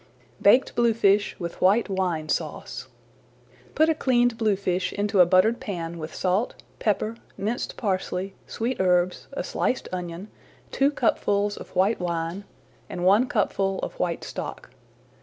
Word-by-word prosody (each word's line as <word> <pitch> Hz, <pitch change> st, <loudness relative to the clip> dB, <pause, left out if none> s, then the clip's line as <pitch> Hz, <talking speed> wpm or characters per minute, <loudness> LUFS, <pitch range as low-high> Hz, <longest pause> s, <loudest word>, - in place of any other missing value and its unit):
BAKED 245 Hz, +6 st, +5 dB
BLUEFISH 215 Hz, -4 st, +3 dB
WITH 170 Hz, -2 st, -6 dB
WHITE 205 Hz, +5 st, +4 dB
WINE 180 Hz, -5 st, -1 dB
SAUCE 150 Hz, -5 st, -3 dB, 0.9 s
Put 315 Hz, +2 st, +4 dB
a 320 Hz, -, +4 dB
cleaned 245 Hz, -5 st, +2 dB
bluefish 200 Hz, -5 st, 0 dB
into 205 Hz, -1 st, 0 dB
a 180 Hz, -, +8 dB
buttered 195 Hz, +6 st, +4 dB
pan 170 Hz, -8 st, -5 dB
with 155 Hz, 0 st, -7 dB
salt, 190 Hz, +6 st, 0 dB, 0.2 s
pepper, 215 Hz, +1 st, 0 dB, 0.2 s
minced 210 Hz, +5 st, -3 dB
parsley, 190 Hz, -2 st, -2 dB
sweet 240 Hz, +3 st, -3 dB
herbs, 180 Hz, -1 st, +2 dB
a -, -, -3 dB
sliced 255 Hz, -, -1 dB
onion, 180 Hz, +2 st, -5 dB, 0.4 s
two 275 Hz, +1 st, +3 dB
cupfuls 205 Hz, -6 st, +1 dB
of -, -, -11 dB
white 195 Hz, +5 st, +2 dB
wine, 170 Hz, +2 st, -3 dB, 0.4 s
and 175 Hz, -, -3 dB
one 205 Hz, +7 st, +5 dB
cupful 195 Hz, -4 st, 0 dB
of -, -, -5 dB
white -, -, -1 dB
stock. -, -, -7 dB
195 Hz, 140 wpm, -25 LUFS, 180-225 Hz, 0.9 s, a